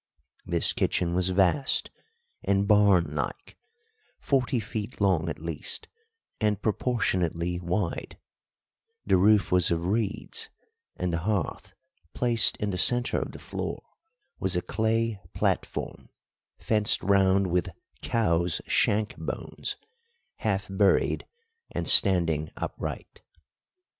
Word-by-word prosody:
This - - 0
kitchen 85 -1 0
was 90 +1 +2
vast 95 +9 +2 0.5
and 100 0 +1
barn 100 -5 +4
like, - - -5 0.6
forty 130 -2 +1
feet 110 +1 -6
long 95 -5 +2
at 75 - -4
least, 80 -1 -4 0.5
and 105 -3 +1
proportionately 90 -7 -1
wide; 90 +1 -3 0.9
the - - +3
roof 105 +2 +4
was 90 -2 +3
of 85 0 -1
reeds, 105 +2 -2 0.5
and 90 -1 -2
the 85 - 0
hearth, 100 +2 -3 0.4
placed 120 -2 +3
in 105 -1 -2
the 90 - -2
centre 120 +1 +2
of - - -5
the - - -10
floor, - - -5 0.6
was 95 -1 0
a 90 - 0
clay 110 +1 0 0.2
platform, - - -2 0.5
fenced 105 -2 +1
round 100 0 +3
with 90 -1 0 0.3
cows' 85 -7 +1
shank 105 +1 +1
bones, - - -5 0.6
half 100 -2 -1
buried 95 0 +1 0.4
and - - -4
standing 85 -6 +5
upright. - - -6
100 Hz, 115 wpm, -27 LUFS, 90-110 Hz, 0.9 s, standing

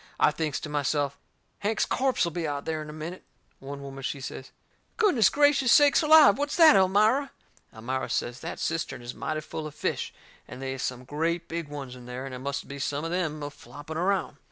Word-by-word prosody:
I - - +5
thinks 155 -4 -2
to - - -5
myself, 145 -1 -1 0.4
Hank's 215 +2 0
corpse'll 255 -10 +1
be 165 -1 -3
out 145 -1 -2
of 140 - -8
there 160 -1 -2
in 155 - -8
a - - -6
minute. 155 +4 -7 0.4
One 140 +1 -8
woman, 135 0 -8
she 140 +2 -3
says: 130 0 -7 0.5
"Goodness 330 - +4
gracious 285 -3 +3
sakes 290 +2 +6
alive! 310 -2 +7
What's 290 0 -1
that, 325 - +8
Elmira?" 215 +9 +3 0.4
Elmira 125 +4 -4
says 120 +2 -2
that 165 - -6
cistern 150 -6 -3
is 120 +1 -6
mighty 155 0 -3
full 155 0 -6
of 150 - -11
fish, - - -2 0.4
and - - -9
they 135 0 -3
is 135 - -6
some 125 0 -3
great 165 +5 -2
big 165 -2 -4
ones 140 -3 -7
in 125 -1 -12
there, 125 +2 -6
and 135 - -7
it 125 - -6
must 140 +1 -4
be 140 0 -7
some 145 +2 -2
of 165 - -3
them 160 -4 -2
a 145 - -5
flopping 145 +4 -10
around. 185 -4 0
155 Hz, 215 wpm, -27 LUFS, 135-190 Hz, 0.5 s, that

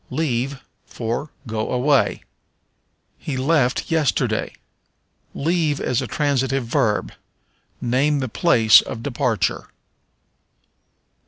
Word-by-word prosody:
Leave 135 -3 -1 0.3
for 120 +6 -4 0.2
Go 110 -2 -3
away. 135 +3 +2 1.0
"He 140 -4 -4
left 135 0 +1
yesterday." 155 -5 0 0.8
Leave 160 -1 0
is 125 - 0
a - - -4
transitive 135 -3 0
verb; 110 -2 0 0.7
name 135 +4 +1
the 130 -2 -2
place 115 -4 +5
of 115 - -7
departure. 120 -5 -1
130 Hz, 90 wpm, -21 LUFS, 120-150 Hz, 1.0 s, place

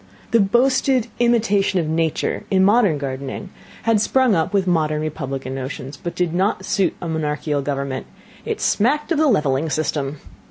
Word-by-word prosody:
The 230 - +4
boasted 250 +3 +2
imitation 215 -5 +2
of 165 - -1
nature 160 0 -1
in 190 -1 +4
modern 205 -6 +4
gardening 140 +6 -5 0.3
had 225 -2 +3
sprung 260 0 +3
up 165 -3 +1
with 200 -2 +1
modern 155 -4 +1
republican 135 -4 -4
notions, 135 +1 -6
but 170 +4 -6
did 175 -2 0
not 190 +1 0
suit 195 -1 +1
a 175 - -5
monarchical 150 -2 -1
government; 140 -1 -3 0.4
it - - -3
smacked 290 +10 +1
of 320 - +2
the 310 - +4
levelling 150 - +1
system. 145 -1 -2
165 Hz, 160 wpm, -21 LUFS, 145-215 Hz, 0.4 s, The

